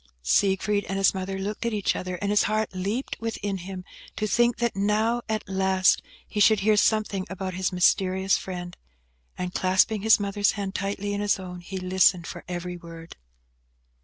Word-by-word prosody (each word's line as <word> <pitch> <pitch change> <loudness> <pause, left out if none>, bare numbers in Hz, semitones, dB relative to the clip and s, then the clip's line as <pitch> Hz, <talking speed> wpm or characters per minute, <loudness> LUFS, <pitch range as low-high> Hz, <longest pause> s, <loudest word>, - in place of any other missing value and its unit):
Siegfried 200 - +2
and 195 +1 -3
his 195 - +4
mother 190 0 -4
looked 200 +2 -4
at 235 -2 -1
each 205 - 0
other, 185 0 -4
and 200 +3 -2
his 210 - +3
heart 215 -1 -1
leapt 200 +8 -3
within 205 -3 -3
him, 185 0 -7 0.3
to 215 - -1
think 240 +3 +2
that 235 -3 -1
now, 215 +4 +1
at 215 -1 -2
last, 190 0 +2 0.3
he 210 - -4
should 210 0 +5
hear 215 +2 +4
something 210 -2 +1
about 190 -1 -4
his 185 +2 -1
mysterious 190 +1 +2
friend; 175 -2 -6 0.6
and, 180 0 -4
clasping 190 +3 +2
his 220 +1 +5
mother's 205 0 +1
hand 200 -2 -4
tightly 200 +1 -3
in 205 - -2
his 205 0 +2
own, 180 -1 -8
he 190 +2 -7
listened 185 -1 +3
for - - -8
every 180 0 -5
word. 165 -1 -11
195 Hz, 180 wpm, -25 LUFS, 185-210 Hz, 0.6 s, should